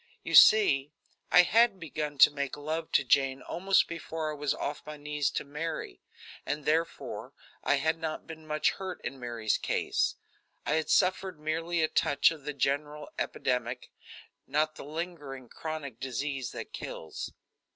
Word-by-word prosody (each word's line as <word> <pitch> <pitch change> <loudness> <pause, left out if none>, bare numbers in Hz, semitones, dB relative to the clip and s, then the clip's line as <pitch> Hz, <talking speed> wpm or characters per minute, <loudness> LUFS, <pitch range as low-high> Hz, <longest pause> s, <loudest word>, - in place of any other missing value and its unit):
You - - -5
see, 150 -10 +7 0.4
I 180 - +8
had 225 +1 +4
begun 150 -3 -4
to 135 - +8
make 140 -1 -3
love 160 +2 -3
to - - +5
Jane 135 +1 +2
almost 190 +3 +2
before 160 -2 -4
I - - -5
was 145 -1 -1
off 145 +1 -3
my 150 0 -8
knees 150 -1 -1
to - - -3
Mary, 150 - -5 0.4
and, 150 0 -3
therefore, 165 +2 -1 0.3
I - - +3
had 160 +3 0
not 160 -1 -4
been 160 -1 -10
much 150 0 +2
hurt 190 -2 -6
in 135 - -5
Mary's 115 -3 -1
case. - - 0 0.5
I - - -1
had 160 0 0
suffered 185 -2 +2
merely 165 +2 -1
a - - +4
touch 145 0 +3
of 155 -4 -9
the 150 - -3
general 145 +2 -1
epidemic, 125 -1 -2 0.6
not 155 +3 +1
the - - -10
lingering, 145 -5 -6
chronic 150 -7 -6
disease 135 0 -3
that - - -7
kills. 80 - -6
150 Hz, 160 wpm, -30 LUFS, 140-165 Hz, 0.6 s, I